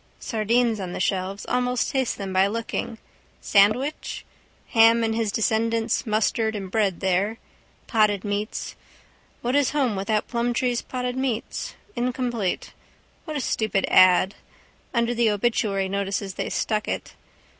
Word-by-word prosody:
Sardines 230 0 +1
on 180 -2 -5
the - - -4
shelves. 190 +1 -1
Almost 250 -1 0
taste 265 -3 0
them 195 -2 -5
by 190 +1 +4
looking. 225 +1 -3 0.4
Sandwich? 215 +9 +2 0.4
Ham 230 0 +5
and 225 0 +1
his 225 -2 0
descendants 225 +2 0
musterred 220 +1 +1
and 195 -3 -5
bred 200 -5 +1
there. 190 +4 +1 0.5
Potted 210 -4 +2
meats. 205 +1 -3 0.7
What 245 +3 0
is 285 -2 +3
home 265 -7 +1
without 210 +2 -1
Plumtree's 240 0 0
potted 250 -1 -4
meat? 260 -4 -3 0.2
Incomplete. 240 -5 -2 0.5
What 310 -3 -4
a - - -2
stupid 215 -5 0
ad! 185 +1 +6 0.6
Under 235 0 +1
the 235 -1 +3
obituary 205 -2 0
notices 195 0 -2
they - - -3
stuck 215 -1 -1
it. - - -4
220 Hz, 135 wpm, -24 LUFS, 200-240 Hz, 0.7 s, ad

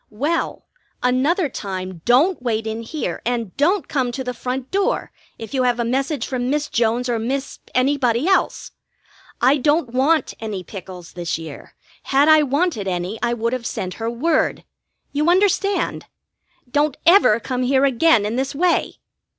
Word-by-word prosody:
"Well, 290 +10 -2 0.4
another 280 +8 +2
time 185 -7 -6
don't 280 +8 +3
wait 225 -3 -1
in 220 +1 -3
here, 285 +6 -4
and 235 -5 -2
don't 350 +7 +1
come 260 -5 -1
to 265 - -4
the 250 -1 -4
front 255 +1 -4
door 395 0 0 0.3
if 225 +4 -9
you 265 - +1
have 245 -1 +1
a 235 - 0
message 270 +4 -1
from 250 -2 -2
Miss 295 +1 -1
Jones 235 +2 +1
or 235 -2 0
Miss 270 +5 -3 0.2
Any 270 +3 +3
body 250 +2 +1
else. 385 - +1 0.7
I 265 +4 +5
don't 290 -2 +1
want 290 +5 +2
any 210 -4 -5
pickles 180 -2 -10
this 175 -3 -3
year. 160 -3 -10 0.3
Had 280 +2 +3
I 310 -1 +7
wanted 285 - 0
any 180 +3 -3
I 240 0 0
would 230 +1 -1
have 250 -2 -3
sent 185 -1 -4
her 225 - -1
word. 295 +8 0 0.5
You 300 +3 +1
understand? 395 +2 +1 0.6
Don't 295 0 +1
ever 340 - +6
come 250 +2 -3
here 265 +2 +3
again 260 -3 +3
in 220 +3 -2
this 270 +1 -2
way!" 350 +4 +1
255 Hz, 165 wpm, -21 LUFS, 225-295 Hz, 0.7 s, I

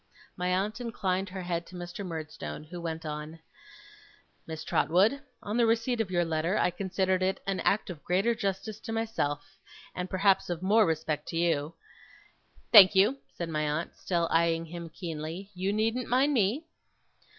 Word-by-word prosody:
My 180 0 -2
aunt 200 +6 0
inclined 195 -5 -1
her 185 0 -6
head 170 -1 -2
to 185 - -12
Mr. 175 +3 -6
Murdstone, 155 - -6
who 175 +3 -8
went 165 -1 -4
on: 150 +1 -5 1.1
'Miss 160 -1 -6
Trotwood: 200 - +2 0.2
on 210 +3 -2
the 235 -1 +4
receipt 230 +1 +1
of 210 - -3
your 175 -2 +1
letter, 165 +4 0
I - - +2
considered 190 0 0
it 190 +1 +1
an 195 -1 -1
act 200 -2 +1
of 160 -4 -10
greater 195 +7 +2
justice 200 +1 -3
to 225 - -7
myself, 195 -7 -2 0.3
and 180 0 -4
perhaps 195 0 +3
of 175 0 -3
more 215 +2 +5
respect 155 -2 -2
to 165 - -3
you 165 -2 0 0.5
' - - -32
'Thank 200 -3 +10
you,' 210 +8 +4 0.2
said 170 -1 -4
my 155 -1 -1
aunt, 155 +3 -3
still 170 -2 0
eyeing 165 0 +2
him 170 0 -7
keenly. 165 +3 -6
'You 190 +2 -1
needn't 225 +4 0
mind 265 +4 +3
me. 240 - +1
185 Hz, 175 wpm, -29 LUFS, 165-205 Hz, 1.1 s, Thank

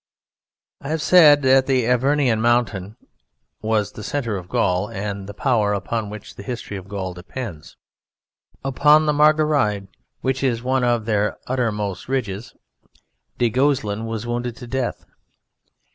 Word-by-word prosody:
I 140 - -7
have 160 +1 -1
said 150 -5 +7
that 130 0 +5
in 135 - +3
the 125 -3 +2
Avernian 125 -1 +2
Mountains 110 -4 +1 0.7
was 110 -1 0
the - - -10
centre 115 -6 -2
of 90 -2 -7
Gaul 90 +2 +1
and 100 -2 -5
the - - -6
power 110 -5 +1
upon 105 +2 -3
which 105 -1 -9
the - - -10
history 115 -1 -6
of 95 -1 -8
Gaul 95 -3 -4
depends. 90 - -8 0.9
Upon 150 +3 +4
the 150 - +2
Margeride, 145 -10 +2 0.3
which 130 0 -1
is 120 -3 0
one 130 0 +1
of 120 -3 +1
their 105 -2 0
uttermost 105 -6 -2
ridges, 110 -5 -3 0.8
du 120 - +2
Guesclin 115 -5 0
was 115 0 -4
wounded 120 0 -3
to 125 - -9
death. 130 0 -3
115 Hz, 145 wpm, -21 LUFS, 105-130 Hz, 0.9 s, said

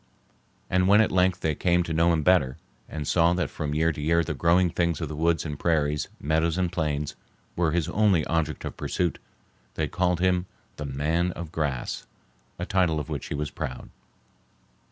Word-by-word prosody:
And 90 0 +2
when 100 +2 +6
at 110 - +3
length 90 0 +2
they 80 - +1
came 90 +3 +2
to 85 - -4
know 85 +2 +3
him 80 -2 +1
better, 75 -7 +3 0.3
and 75 -2 -5
saw 85 0 +4
that 90 -4 -1
from 75 -1 -3
year 80 +2 +3
to 75 - -6
year 85 +3 +3
the - - -3
growing 85 +1 +3
things 85 -2 0
of 80 -4 -3
the 75 - -5
woods 80 +2 +1
and 75 -2 -5
prairies, 75 -3 +1
meadows 80 +3 +1
and 90 -2 0
plains, 75 -4 -2 0.4
were 85 -2 +2
his 85 -2 0
only 100 -7 +2
object 80 -2 -1
of - - -5
pursuit, 90 -2 -2 0.6
they - - 0
called 90 -2 0
him 90 0 +1 0.3
the 75 - -5
"Man 80 +6 0
of 85 -2 -7
Grass," 70 -7 -3 0.5
a 90 - -3
title 90 -6 +1
of 75 - -6
which 75 -4 -4
he - - -3
was 75 0 -3
proud. 65 -2 -6
85 Hz, 195 wpm, -26 LUFS, 75-90 Hz, 0.6 s, when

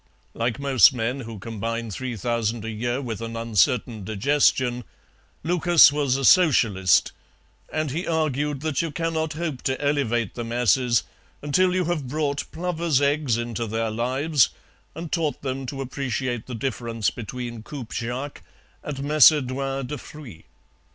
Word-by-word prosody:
Like 115 +1 -1
most 140 -2 +5
men 125 +3 -2
who 115 -3 -7
combine 115 +2 -4
three 125 +4 -4
thousand 115 +1 -1
a 115 - -3
year 120 +5 -2
with 115 -3 -5
an 115 0 -5
uncertain 115 0 +1
digestion, 125 +3 +1 0.6
Lucas 175 -1 +6
was 140 -3 0
a 135 - -1
Socialist, 115 - +4 0.6
and 155 -3 -1
he 165 +6 -3
argued 150 -3 -1
that 155 -3 0
you 165 - -2
cannot 160 0 -2
hope 155 -5 -4
to 130 0 -1
elevate 135 -7 0
the 120 - -5
masses 120 -2 +2 0.4
until 180 +5 +2
you 185 -1 +1
have 160 -5 -2
brought 145 +1 -2
plovers' 170 -4 0
eggs 145 -4 +1
into 120 -1 -3
their 115 +1 -2
lives 130 +5 +2 0.5
and 165 0 -7
taught 160 -3 -1
them 135 -1 -3
to 135 +1 -5
appreciate 125 -2 -3
the 125 - -5
difference 115 -2 -2
between 120 0 -6
coupe 125 0 -8
Jacques 125 +5 -4 0.4
and 150 -2 -5
Macédoine 135 -2 +3
de 145 +2 -5
fruits. 120 - -12
130 Hz, 145 wpm, -24 LUFS, 115-150 Hz, 0.6 s, Lucas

